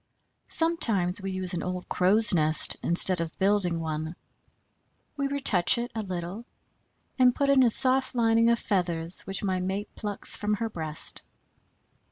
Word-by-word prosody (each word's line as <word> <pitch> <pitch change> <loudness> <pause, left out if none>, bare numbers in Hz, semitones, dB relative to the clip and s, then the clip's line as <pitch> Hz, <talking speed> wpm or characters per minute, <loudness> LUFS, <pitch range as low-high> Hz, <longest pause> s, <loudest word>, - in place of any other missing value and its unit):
Sometimes 225 - 0
we 195 - -6
use 185 -1 -1
an 175 - -4
old 180 0 -7
crow's 205 +4 +2
nest 155 -2 +4
instead 175 +1 +4
of 165 -1 -7
building 190 -4 -1
one; 160 +1 -6 1.0
we 280 -1 -3
retouch 265 -10 +2
it 240 +1 -5
a 225 - -5
little 185 +2 -7 0.8
and 250 -1 +3
put 280 -1 -1
in 270 -1 +3
a 245 - +3
soft 260 +2 +4
lining 230 -1 +1
of 235 - +1
feathers 175 -5 0
which 195 +1 0
my 190 -2 -2
mate 190 +3 -6
plucks 205 -2 -2
from 210 0 -3
her 225 +1 -6
breast. 155 -4 -5
195 Hz, 155 wpm, -25 LUFS, 175-230 Hz, 1.0 s, nest